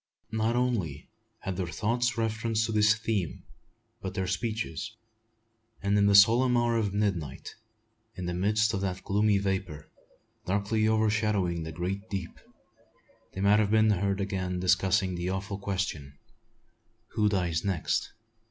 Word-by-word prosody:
Not 110 +1 0
only 105 - -1 0.3
had 95 -2 -4
their 95 -2 -2
thoughts 120 +6 0
reference 110 0 0
to 110 - -3
this 105 0 +4
theme, 110 -6 -2 0.6
but 95 - -5
their 95 - -1
speeches; 110 +1 -3 0.8
and 100 0 0
in 100 0 +4
the 100 - +4
solemn 120 +5 +6
hour 120 0 +2
of 110 -3 0
midnight, 95 -9 -2 0.6
in 90 - -5
the 90 - -2
midst 105 +5 +1
of 95 - -1
that 95 -1 -3
gloomy 105 +1 +2
vapour, 95 -6 -3 0.6
darkly 105 +3 +1
overshadowing 105 -5 +1
the 80 0 -5
great 95 +6 -4
deep, 95 -4 -5 0.9
they 95 - -5
might 100 +2 +5
have 105 -2 +2
been 110 0 +4
heard 100 0 0
again 95 -2 -2
discussing 95 +1 +2
the 90 +1 -3
awful 95 +1 -3
question, 95 -8 -3 0.9
"Who 105 -1 +1
dies 90 -5 0
next?" 95 -5 -1
100 Hz, 145 wpm, -28 LUFS, 90-110 Hz, 0.9 s, solemn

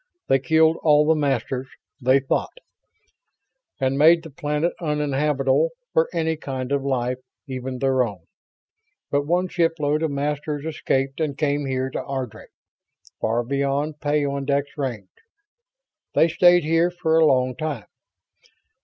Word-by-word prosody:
They 135 - +4
killed 160 +4 +3
all 150 -1 +5
the 160 - +4
Masters, 135 -3 -1 0.3
they 130 +2 +4
thought, 135 - -2 1.2
and 135 0 0
made 165 +2 +6
the 160 - -10
planet 150 +4 -1
uninhabitable 150 -1 +1 0.2
for 160 0 +3
any 160 -2 -1
kind 130 -3 -5
of 140 -1 +1
life, 125 -2 -1 0.3
even 130 -2 -5
their 130 0 +2
own. 100 -7 -6 0.9
But 145 0 0
one 180 +3 +1
shipload 165 -4 0
of 160 - 0
Masters 145 +1 -3
escaped 135 -3 -1
and 150 -3 -2
came 145 -2 0
here 130 0 -2
to - - -4
Ardry 130 -5 -5 0.7
far 115 +2 0
beyond 140 +3 -1
peyondix 140 -1 -1
range. 120 -10 -4 1.1
They 165 - +5
stayed 175 +1 +5
here 165 +3 +2
for 165 -2 +1
a 160 - +6
long 130 -2 +2
time. 145 -6 -4
145 Hz, 135 wpm, -23 LUFS, 135-155 Hz, 1.2 s, made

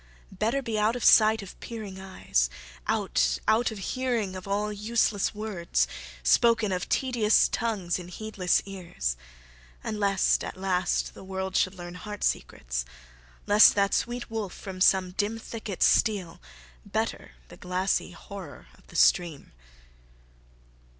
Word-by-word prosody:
Better 225 +8 -1
be 225 -3 -2
out 215 +3 +2
of 245 - -4
sight 220 -1 +6
of 190 - -12
peering 210 -5 -7
eyes; 185 - -1 0.4
Out - - +1
out 230 +3 +3
of 220 - -7 0.2
hearing 240 -7 -1
of 185 +1 -8
all 210 +1 -1
useless 210 -1 0
words, 175 - -1 0.4
Spoken 225 - +4
of 180 -1 -2
tedious 240 -5 +3
tongues 205 -7 -2
in 175 - -9
heedless 185 -1 -1
ears. 170 - -4 0.7
And 215 - -4
lest, 195 -2 +2
at - - -6
last, 185 -1 0
the - - -12
world 190 0 -4
should 185 +1 +2
learn 175 -1 -8
heart 205 +3 -7
secrets; - - -2 0.6
Lest 205 +1 +7
that 200 -1 +2
sweet 240 -1 -2
wolf 215 -4 -4
from 185 -2 -8
some 185 -1 +4
dim 205 +4 -1
thicket 220 -4 -4
steal; 200 - +2 0.4
Better - - -3 0.2
the - - -13
glassy 185 +1 -1
horror 180 - -10
of - - -23
the - - -15
stream. 170 -5 +2
200 Hz, 140 wpm, -27 LUFS, 180-220 Hz, 0.7 s, Lest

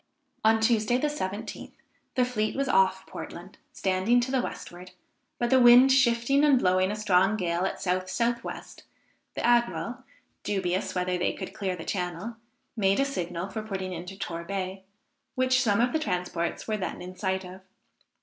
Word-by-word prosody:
On 220 0 +4
Tuesday 220 +1 +2
the 295 +4 0
17th, 205 -8 -5 0.4
the 255 -2 +3
fleet 215 -4 -1
was 275 0 -1
off 475 0 +3
Portland, - - -9
standing 190 +6 +2
to 255 +2 -3
the 265 -2 +2
westward; 180 -5 -8 0.4
but 240 0 -1
the 260 - +6
wind 245 +2 +8
shifting 260 +1 +3
and 290 -3 +5
blowing 185 -4 +2
a 210 - -2
strong 200 0 +2
gale 175 -1 -1
at - - -3
south 185 0 -1
south 235 +2 0
west, - - -8 0.5
the - - -2
admiral, 240 +1 +1 0.4
dubious 190 -2 -2
whether 180 0 0
they 180 - 0
could - - -7
clear 190 -3 -2
the 165 - -8
channel, 180 +4 -3 0.4
made 195 -1 +2
a 275 - +3
signal 180 -8 -3
for 215 +3 -5
putting 190 -3 -4
into 180 +3 -7
Torbay, 185 +2 -4 0.5
which 255 0 +3
some 205 -5 +2
of 245 +1 +2
the 315 - +2
transports 180 - -3
were 215 -1 0
then 195 - -4
in 180 +1 -8
sight 190 -1 -2
of. 185 +1 -10
205 Hz, 170 wpm, -27 LUFS, 185-240 Hz, 0.5 s, wind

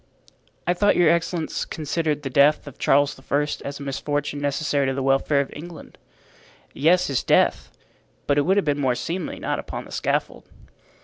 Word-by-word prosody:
"I 175 - +2
thought 205 +3 +3
your 175 -3 +5
excellence 170 -1 -1
considered 155 -1 -2
the 135 - -4
death 140 +3 +4
of 145 - -11
Charles 145 0 +2
I. 145 +1 +3 0.2
as 140 0 -6
a - - -7
misfortune 145 +1 -3
necessary 145 -1 0
to 135 - -1
the 135 - -2
welfare 135 +1 +2
of 140 - -6
England." 165 +2 -11 0.7
"Yes, 175 +6 +3
his 135 -3 0
death; - - +2 0.5
but 145 0 +2
it - - +4
would 190 +7 +2
have 200 - +2
been 145 -1 0
more 130 -2 +1
seemly 170 +6 -4
not - - -2
upon - - -6
the - - -14
scaffold." - - -2
145 Hz, 180 wpm, -23 LUFS, 140-165 Hz, 0.7 s, your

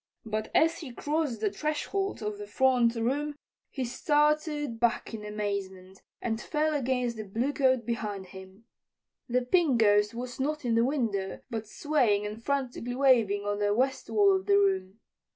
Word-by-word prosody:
But 215 0 -3
as 325 +1 +3
he 295 -7 -7
crossed 290 -2 -2
the 210 -2 +1
threshold 305 - -2
of 210 -1 -4
the 205 - -7
front 245 +1 +3
room 280 +6 -1 0.3
he 265 -2 -3
started 295 -1 +1
back 235 0 0
in 215 -2 -6
amazement 200 -3 -5 0.2
and 225 -1 -2
fell 310 0 0
against 250 -4 -1
the 215 - -4
bluecoat 255 +3 +1
behind 210 -4 -3
him. 190 +3 -13 0.6
The 250 +1 +1
Pink 275 -2 +3
Ghost 210 0 +4
was 245 +1 -6
not 295 +1 -2
in 235 - +1
the 230 0 +4
window, 225 -9 -1
but 220 -2 -4
swaying 230 -7 +1
and 215 +2 -6
frantically 255 -3 -2
waving 230 -7 +3
on 205 0 -1
the 205 0 +1
west 265 +3 0
wall 400 -2 +4
of 380 +1 -3
the 400 0 +5
room. 380 - 0
240 Hz, 165 wpm, -28 LUFS, 210-290 Hz, 0.6 s, the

